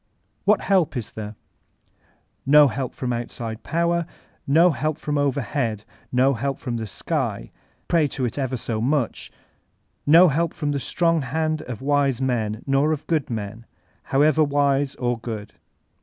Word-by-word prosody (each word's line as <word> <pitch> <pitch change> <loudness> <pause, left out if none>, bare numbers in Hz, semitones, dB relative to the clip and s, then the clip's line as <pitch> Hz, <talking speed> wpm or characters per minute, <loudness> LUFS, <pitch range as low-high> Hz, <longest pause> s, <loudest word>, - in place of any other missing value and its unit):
What 210 0 +4
help 185 -8 +2
is 120 - -5
there? 105 0 -7 1.1
No 145 +1 +6
help 125 +3 -3
from 125 -1 -3
outside 115 -1 -5
power; 170 0 0 0.4
no 165 +6 +5
help 155 0 -2
from 150 -1 -2
overhead; 130 -5 -1 0.3
no 130 +2 +3
help 135 +3 -2
from 120 -3 -4
the 110 -1 -4
Sky, - - -3 0.4
pray 165 -3 +3
to 135 -2 -3
it 120 - -3
ever 130 -1 -1
so 115 -1 -3
much; 130 0 -1 0.8
no 170 +4 +8
help 165 +4 0
from 145 -3 -2
the 140 - -1
strong 165 +3 +1
hand 155 +4 -1
of 125 0 -7
wise 140 -3 +2
men, 115 -5 -1
nor 140 +3 +2
of 155 -1 -3
good 155 -4 0
men, 110 0 -5 0.4
however 155 +3 +3
wise 140 -1 +1
or 120 -2 -1
good. 110 -3 -6
135 Hz, 155 wpm, -23 LUFS, 120-155 Hz, 1.1 s, no